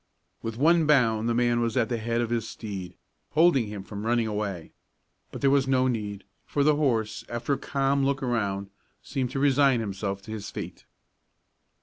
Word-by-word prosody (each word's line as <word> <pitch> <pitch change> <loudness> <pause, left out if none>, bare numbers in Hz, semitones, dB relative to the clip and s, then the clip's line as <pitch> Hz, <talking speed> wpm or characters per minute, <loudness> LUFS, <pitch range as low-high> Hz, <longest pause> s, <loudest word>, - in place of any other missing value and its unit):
With 115 0 -5
one 160 +3 +4
bound 115 -6 +3
the 120 - +1
man 120 0 +2
was 115 +1 -1
at 115 -3 +3
the 120 -2 -2
head 115 +1 -1
of 120 -1 -2
his 115 -2 -1
steed, 95 -5 -7 0.4
holding 155 -7 +4
him 105 -2 -6
from 100 +1 -7
running 120 0 +2
away, 105 -6 -3 0.6
but - - -7
there 135 - +4
was 135 -1 +3
no 130 -1 +3
need, 105 -5 -3 0.2
for 145 - 0
the 150 +1 +4
horse, 120 -8 0
after 120 +4 -1
a - - 0
calm 140 0 0
look 135 0 0
around, 100 -5 -1 0.3
seemed 130 -3 -2
to 135 - -3
resign 140 -2 +4
himself 100 -2 -3
to 110 - -9
his 105 -2 -5
fate. - - -7
120 Hz, 190 wpm, -27 LUFS, 105-135 Hz, 0.6 s, one